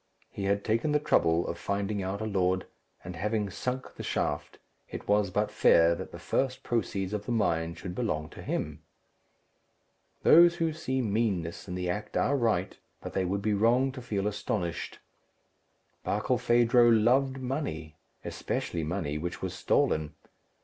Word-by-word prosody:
He 100 - -4
had 100 +1 +1
taken 115 +7 +1
the 150 - +4
trouble 85 - +2
of 85 - -4
finding 100 +1 -2
out 95 +3 -3
a - - -2
lord; 95 -3 +1 0.4
and 90 0 -7
having 105 +3 -1
sunk 125 +6 -4
the - - -8
shaft, - - -2 0.3
it - - -7
was 105 -1 +3
but - - 0
fair 85 0 +5
that 85 - -6
the - - -8
first 130 -1 -1
proceeds 100 -4 -1
of 105 -1 -4
the - - -1
mine 85 -7 0
should 90 -1 -7
belong 90 -9 -2
to - - -11
him. - - -3 1.4
Those 170 +1 +7
who 165 -2 0
see 130 -5 -2
meanness 100 -7 -1
in 90 - -4
the 90 -1 -2
act 105 +4 -3
are 140 - +2
right, 110 -8 0 0.2
but - - -8
they 95 - 0
would 100 +2 -2
be 105 0 +1
wrong 120 +6 +3
to 130 -1 -8
feel 105 -5 -2
astonished. 100 -4 -3 1.1
Barkilphedro 120 0 +3
loved 125 +4 +3
money, 125 - -4 0.3
especially 85 - -3
money 75 -2 -2
which 85 +2 -5
was - - -2
stolen. 75 -1 +1
100 Hz, 160 wpm, -29 LUFS, 90-120 Hz, 1.4 s, Those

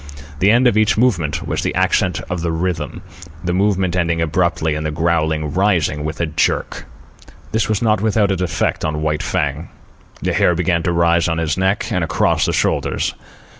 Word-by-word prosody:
The 95 - +4
end 120 +4 +4
of 120 -4 +3
each 110 0 +2
movement 90 - +1
was - - -1
the - - -2
accent 95 +1 +1
of 90 -1 -3
the 85 -1 -1
rhythm, 85 +2 -3 0.4
the 90 -1 -1
movement 95 -2 +1
ending 85 -2 0
abruptly 80 -1 0
and 75 +1 -3
the 75 - -1
growling 80 -1 0
rising 90 -6 +1
with 80 +1 -4
a 85 - +1
jerk. 80 -1 -1 0.6
This 110 0 0
was 110 +1 0
not 105 -3 +2
without 105 -2 +2
its 95 -1 -1
effect 90 - -1
on 75 0 -2
White 75 -1 0
Fang. 75 +3 -2 0.5
The - - 0
hair 90 - +3
began 85 -1 +1
to 85 - -1
rise 85 0 +2
on 80 -1 -1
his 80 -1 0
neck 95 +3 0
and 90 -5 0
across 80 - +1
the - - +1
shoulders. - - 0
85 Hz, 190 wpm, -18 LUFS, 80-95 Hz, 0.6 s, The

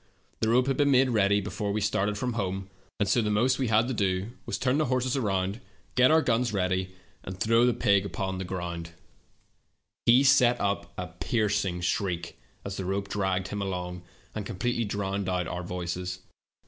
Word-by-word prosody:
The 110 - +1
rope 125 +2 +4
had 135 -1 0
been 145 -1 +3
made 130 -1 +4
ready 100 -2 +3
before 105 +1 -3
we 105 - 0
started 105 0 0
from 125 +3 -2
home, 95 -3 -3 0.3
and 105 - +1
so 115 +5 +3
the 105 - -1
most 120 +6 +2
we 130 - +1
had 110 +2 +3
to 130 - -1
do 95 0 -1 0.2
was - - -2
to - - -6
turn 130 +3 +2
the 155 - +2
horses 130 0 0
around, 100 -3 -1 0.3
the 115 -9 +2 1.6
ground. 85 -2 -5 1.2
He 125 +3 +7
set 125 -3 +5
up 100 -4 -1
a 90 - -3
piercing 100 0 -1
shriek 90 -1 -2 0.3
as 100 0 -5
the 95 - -3
rope 100 +1 -2
dragged 95 -2 -1
him 105 - -3
along, 90 -2 -4 0.3
and 105 - -4
completely 115 +5 -1
drowned 100 -1 -2
our 90 -1 -2
voices. 90 0 -4
100 Hz, 160 wpm, -28 LUFS, 95-120 Hz, 1.6 s, He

